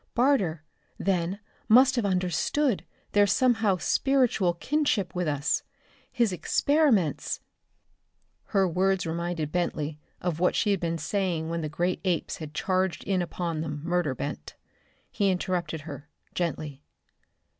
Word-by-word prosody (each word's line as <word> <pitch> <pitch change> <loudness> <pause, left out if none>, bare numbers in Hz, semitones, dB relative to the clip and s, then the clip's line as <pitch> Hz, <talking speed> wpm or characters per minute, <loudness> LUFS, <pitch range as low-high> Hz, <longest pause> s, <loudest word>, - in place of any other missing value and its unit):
Barter, 220 - +2 0.3
then 185 0 0 0.3
must 255 +4 +7
have 235 -5 +1
understood 185 - +1 0.3
their 205 0 +5
somehow 220 -3 +3
spiritual 240 -6 +2
kinship 260 - 0
with 180 -2 -1
us. 145 +1 0 0.5
His 235 -6 +1
experiments 230 - +2 0.6
" - - -48 0.3
Her 195 -2 +2
words 185 +1 +1
reminded 165 -2 -2
Bentley 155 -4 -2 0.2
of 175 -3 -2
what 180 - +2
she 210 - +2
had 195 - +1
been 165 -1 -1
saying 165 +1 -1
when 170 0 -2
the 155 - -3
great 175 +4 -1
apes 180 -4 -1
had 155 -2 -8
charged 185 -2 0
in 190 -2 0
upon 170 -2 -3
them, 150 -2 -5
murder 170 -5 0
bent. - - -5 0.6
He 200 -1 +1
interrupted 175 -4 -1
her, 145 -1 -9 0.2
gently. 155 -5 -3
180 Hz, 135 wpm, -27 LUFS, 160-200 Hz, 0.6 s, must